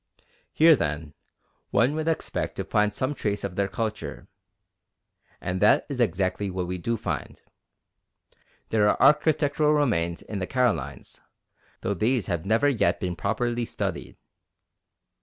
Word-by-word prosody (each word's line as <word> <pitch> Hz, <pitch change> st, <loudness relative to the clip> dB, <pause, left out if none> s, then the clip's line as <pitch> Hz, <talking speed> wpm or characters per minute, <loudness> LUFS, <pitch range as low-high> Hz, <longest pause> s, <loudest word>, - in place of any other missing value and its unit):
Here, 160 Hz, 0 st, +6 dB
then, 75 Hz, -, -3 dB, 0.6 s
one 120 Hz, +7 st, +3 dB
would 155 Hz, +1 st, -3 dB
expect 165 Hz, -, -2 dB
to -, -, -3 dB
find 105 Hz, 0 st, +1 dB
some 130 Hz, +6 st, -2 dB
trace 105 Hz, -6 st, -2 dB
of 100 Hz, -3 st, -4 dB
their 100 Hz, 0 st, +1 dB
culture, 110 Hz, +2 st, -4 dB, 1.1 s
and 90 Hz, +1 st, -3 dB
that 105 Hz, -, +5 dB
is 135 Hz, -3 st, -2 dB
exactly 95 Hz, -1 st, 0 dB
what 90 Hz, -1 st, -3 dB
we 90 Hz, +1 st, -4 dB
do 115 Hz, +6 st, -1 dB
find. -, -, -4 dB, 1.3 s
There 105 Hz, -2 st, +3 dB
are -, -, +2 dB
architectural 150 Hz, 0 st, +3 dB
remains 100 Hz, -, 0 dB
in 105 Hz, -, -5 dB
the 95 Hz, -, -3 dB
Carolines, 105 Hz, -, -1 dB, 0.6 s
though 100 Hz, -, -1 dB
these 115 Hz, +5 st, +1 dB
have 85 Hz, -1 st, -3 dB
never 115 Hz, +7 st, +3 dB
yet 110 Hz, -10 st, +2 dB
been 90 Hz, -2 st, -3 dB
properly 120 Hz, +6 st, -1 dB
studied. -, -, -4 dB
105 Hz, 140 wpm, -26 LUFS, 90-130 Hz, 1.3 s, Here